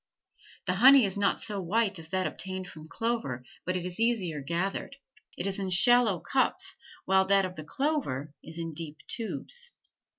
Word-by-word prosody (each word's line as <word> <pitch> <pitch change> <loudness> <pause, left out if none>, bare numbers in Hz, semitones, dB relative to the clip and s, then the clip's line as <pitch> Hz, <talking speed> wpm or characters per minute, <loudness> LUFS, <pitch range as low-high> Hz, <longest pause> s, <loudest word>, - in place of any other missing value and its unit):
The 180 - +1
honey 265 -1 +9
is 190 - -3
not 200 -1 +1
so 210 -3 -2
white 200 +1 +1
as 160 - -10
that 185 +1 0
obtained 185 -1 -4
from 155 -2 -10
clover 225 - -2 0.2
but 185 0 +1
it 180 - -4
is 180 +2 -6
easier 200 -10 0
gathered; 175 - -2 0.4
it 175 - -2
is 195 0 -1
in 190 -1 -2
shallow 220 0 +5
cups 360 - 0 0.3
while 190 0 +4
that 195 0 +4
of 180 -1 -6
the 155 - -7
clover 155 - -2
is 160 +1 -10
in 165 -1 -4
deep 155 -1 -7
tubes. 485 - -2
190 Hz, 175 wpm, -29 LUFS, 170-230 Hz, 0.4 s, honey